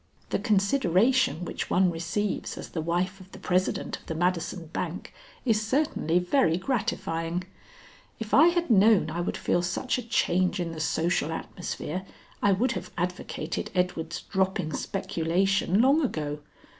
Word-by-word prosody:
The - - +1
consideration 200 - +2
which - - -4
one 185 -1 +3
receives 175 +5 -2
as - - -7
the 160 - -3
wife 180 +4 -1
of 185 +1 -15
the - - -8
president 185 +1 -1
of - - -22
the 160 - -3
Madison 175 +1 -1
bank 175 +1 -4 0.3
is 220 -3 +3
certainly 225 - +1
very 180 - +2
gratifying. 180 -6 -2 0.8
If 225 -2 -6
I 310 +4 +8
had 345 -5 +1
known 205 -5 +5
I 170 +2 -2
would 175 - -2
feel 175 - +1
such 185 +9 -1
a - - -3
change 185 -5 +1
in 170 -1 -2
the 160 - -7
social 160 +1 0
atmosphere, 180 +1 -5 0.4
I 205 - +4
would 230 +6 +2
have 185 -5 -5
advocated 175 -2 -3
Edward's 175 -2 -1
dropping 190 -4 -1
speculation 190 +3 +1
long 280 +5 +5
ago. 150 - -2
180 Hz, 150 wpm, -27 LUFS, 170-210 Hz, 0.8 s, I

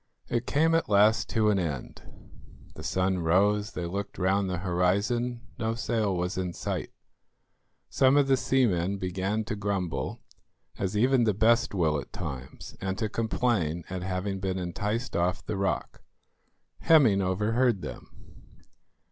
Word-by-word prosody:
It 120 0 -1
came 160 +3 +2
at 165 - +1
last 105 +2 +4
to 110 -1 +2
an 100 - +1
end. 75 -8 -4 0.7
The - - -10
sun 95 0 0
rose; 100 +5 +2
they 90 - -4
looked 100 +3 -5
round 95 +1 +1
the 90 - -2
horizon; 100 +7 0 0.2
no 115 0 -1
sail 110 -5 0
was 90 +2 -2
in 90 -2 -3
sight. - - -4 1.0
Some 135 +1 +3
of 140 -1 +4
the 135 - +5
seamen 100 -9 +1
began 95 +3 -2
to 110 0 -4
grumble, 100 -6 -2 0.6
as 95 +2 -1
even 125 +2 +3
the 105 -3 +1
best 115 0 +3
will 80 -5 +1
at - - -9
times, 65 -1 -7
and 95 0 -2
to 110 - -1
complain 105 -8 0
at 95 -1 -3
having 95 +1 -3
been 95 -1 -2
enticed 105 +7 -3
off 90 +1 0
the 110 - -3
rock. 95 -1 -2 0.8
Hemming 125 -12 +5
overheard 105 +3 +1
them. - - -8
100 Hz, 150 wpm, -28 LUFS, 90-115 Hz, 1.0 s, the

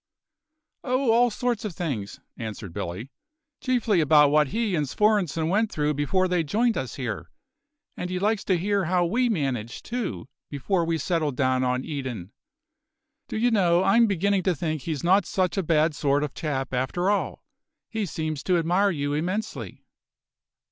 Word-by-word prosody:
"Oh, 255 -1 +1
all 240 +2 +4
sorts 240 0 -2
of 205 -6 -5
things," 130 - -4 0.2
answered 110 -5 -7
Billy, 100 +13 -5 0.5
"chiefly 235 - +1
about 150 -1 +5
what 150 0 +4
he 220 - -1
and 150 -5 0
Svorenssen 190 -5 +1
went 210 +5 +1
through 150 0 0
before 165 +6 +1
they 180 -2 +1
joined 225 +9 +1
us 130 -4 -4
here. 115 -10 -4 0.7
And 180 - -4
he 185 - -2
likes 205 +2 0
to 185 - +2
hear 200 +2 0
how 175 +1 +2
we 240 +8 +1
managed, 135 - -2
too, 235 - -4 0.2
before 170 +5 -1
we 165 0 0
settled 155 -3 -1
down 130 -1 +1
on 125 0 0
Eden. 130 - -5 1.0
Do - - -4
you 240 +2 +2
know, 180 -4 +3
I'm 230 +4 +5
beginning 200 0 +1
to 180 -1 +1
think 155 -1 -2
he's 155 -1 -4
not 190 +2 +3
such 185 -2 0
a 195 - +1
bad 155 -2 +2
sort 145 0 +1
of 145 -2 -4
chap 135 -4 -3
after 175 +10 0
all. 205 - -2 0.4
He 220 -3 -3
seems 155 -2 -3
to 180 -2 +3
admire 180 +5 +2
you 145 -5 -2
immensely." 180 +8 -4
170 Hz, 170 wpm, -25 LUFS, 145-200 Hz, 1.0 s, about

